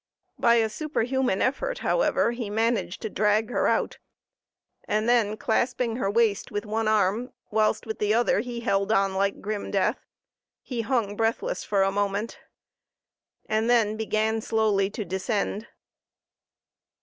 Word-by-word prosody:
By 235 - +5
a 225 -1 +3
superhuman 265 -4 -1
effort, - - -1
however, - - +2
he 235 -3 -5
managed 225 -2 -1
to 220 - -2
drag 215 +2 +1
her - - +1
out, - - 0 0.9
and 215 +2 0
then 225 -3 +2
clasping 235 +1 0
her 195 -6 0
waist 220 -1 +1
with 205 +1 -4
one 220 +1 -1
arm, 215 +3 +1 0.2
whilst 215 0 +1
with 220 -1 -5
the 210 0 +1
other 235 -1 +3
he 240 +1 -4
held 200 -3 0
on 195 -3 +2
like 195 +1 0
grim 210 0 -4
death, 205 +4 +1 0.6
he 245 -3 -3
hung 225 -4 -1
breathless 225 +1 -1
for 200 -2 +1
a 195 - +1
moment, 205 +2 -2 1.1
and 220 +2 0
then 225 -3 +3
began 220 0 0
slowly 215 -3 +1
to 210 0 -5
descend. 200 +3 -2
220 Hz, 145 wpm, -26 LUFS, 205-235 Hz, 1.1 s, By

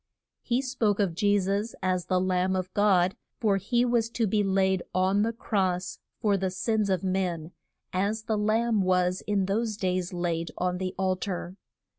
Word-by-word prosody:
He 245 +2 0
spoke 230 -6 0
of 195 -5 +1
Je 205 +3 +2
sus 200 +4 -1
as 185 -1 0
the 185 -1 +2
Lamb 185 0 +1
of 185 0 -3
God, 195 -3 +3 0.2
for 205 -4 +2
he 240 +5 +1
was 235 -2 +1
to 230 -1 0
be 210 +1 +1
laid 190 -1 +2
on 190 +2 +3
the 225 +2 +1
cross 190 -5 -1 0.2
for 205 -2 +2
the 190 0 -1
sins 210 +2 0
of 185 -2 0
men, 180 -4 -1 0.4
as 205 +4 0
the 220 -1 -1
lamb 220 +1 +2
was 180 -1 +1
in 200 -2 +1
those 215 +2 -1
days 185 -3 -1
laid 170 -2 -2
on 180 0 -1
the 185 0 -3
al 185 -1 +1
tar. 180 -1 -4
190 Hz, 180 wpm, -27 LUFS, 185-215 Hz, 0.4 s, God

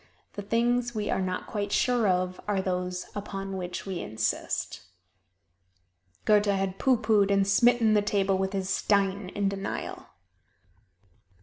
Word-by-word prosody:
The 205 - -5
things 240 +3 0
we 210 -1 -1
are - - 0
not 185 -1 -3
quite 205 -1 -3
sure 245 -2 +2
of 185 0 0
are 205 -2 +1
those 180 -1 -2
upon 195 -1 -5
which 180 -1 -5
we 190 -3 -4
insist. 110 +1 -2 1.4
Goethe 210 -1 +4
had 195 -1 0
pooh 260 -2 +3
poohed 210 -4 +3
and 195 -1 +3
smitten 235 +1 +4
the 210 - +4
table 195 -2 +1
with 190 +1 -1
his 190 -1 -2
"stein" 195 -1 +1
in 200 -1 +1
denial. 195 0 -4
200 Hz, 140 wpm, -27 LUFS, 190-210 Hz, 1.4 s, Goethe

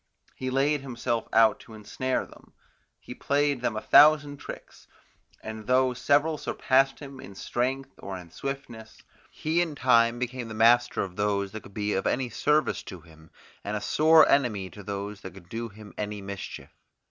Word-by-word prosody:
He 130 - -4
laid 140 +2 +1
himself 120 -3 -3
out 110 -1 +4
to 110 - -13
ensnare 110 +5 -2
them; - - -18 0.5
he - - -9
played 140 -2 0
them 120 -3 -1
a - - -3
thousand 150 -1 +6
tricks; - - -11 0.6
and 110 -1 -7
though 130 0 +3
several 145 +5 +1
surpassed 135 +1 +1
him 140 -2 -10
in 100 -6 -11
strength 130 +6 -2
or 95 -1 -6
in 85 -2 -12
swiftness, 120 -3 -7 0.3
he 160 +3 -1
in 165 -4 -2
time 120 -3 +3
became 125 -1 -4
the 110 - -7
master 120 +2 +4
of 90 -2 -8
those 100 -1 0
that 110 +1 -7
could 100 - -16
be 105 0 -1
of 95 - -1
any 125 -2 -1
service 150 +7 +1
to 90 -3 -10
him, 80 -1 -18 0.3
and 105 +1 -3
a - - -3
sore 155 +8 +5
enemy 110 -9 +1
to 105 - -11
those 100 0 -6
that 95 - -9
could 90 -3 -15
do 115 +2 -5
him 105 0 -13
any 105 0 -3
mischief. 100 -1 -8
115 Hz, 180 wpm, -27 LUFS, 105-135 Hz, 0.6 s, thousand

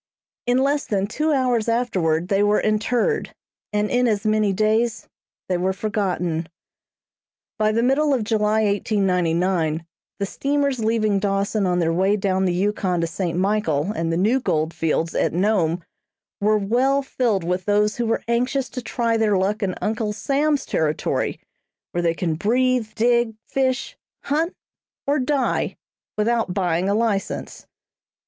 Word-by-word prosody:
In 245 +1 +3
less 285 +1 +1
than 195 -2 0
two 305 +9 -1
hours 250 -5 +1
afterward 185 -8 0
they 195 0 +2
were 205 0 +3
interred, 230 - 0 0.4
and 210 0 +1
in 250 0 +3
as 210 -2 0
many 215 -1 +2
days 220 +3 +1 0.4
they 180 - 0
were 185 +2 0
forgotten. 180 -5 -2 1.1
By 215 0 +3
the 230 +2 +1
middle 285 +4 +2
of 255 -5 +1
July, 215 0 +1
1899, 180 -5 +1 0.3
the 200 - -1
steamers 280 +3 -1
leaving 215 -2 +1
Dawson 200 0 0
on 180 -1 +1
their 165 -2 +1
way 190 +4 +2
down 190 -1 0
the 180 - +1
Yukon 190 -2 0
to - - +1
St. 170 0 -3
Michael 190 -4 +1
and 165 -5 -2
the 165 - 0
new 220 +9 +2
gold 160 -8 -1
fields 165 0 -1
at - - 0
Nome, 175 -3 +1 0.6
were 215 +1 +3
well 255 +7 +1
filled 235 -8 0
with 180 +1 -2
those 210 +1 +2
who 240 -1 -1
were 225 - 0
anxious 250 +3 0
to 250 - -5
try 230 -1 0
their 215 -3 +2
luck 200 +4 0
in 190 -3 -1
Uncle 215 0 -1
Sam's 285 +5 0
territory 155 -1 -1 0.5
where 175 - -1
they 165 -1 +1
can 170 -2 -1
breathe, 245 +6 +1
dig, 235 -1 +2
fish, 265 -1 -1 0.3
hunt, 320 +5 -1 0.5
or 285 +2 +1
die 265 +1 0 0.4
without 220 -3 0
buying 180 -1 0
a 200 - +2
license. 215 -3 -2
210 Hz, 155 wpm, -22 LUFS, 185-240 Hz, 1.1 s, In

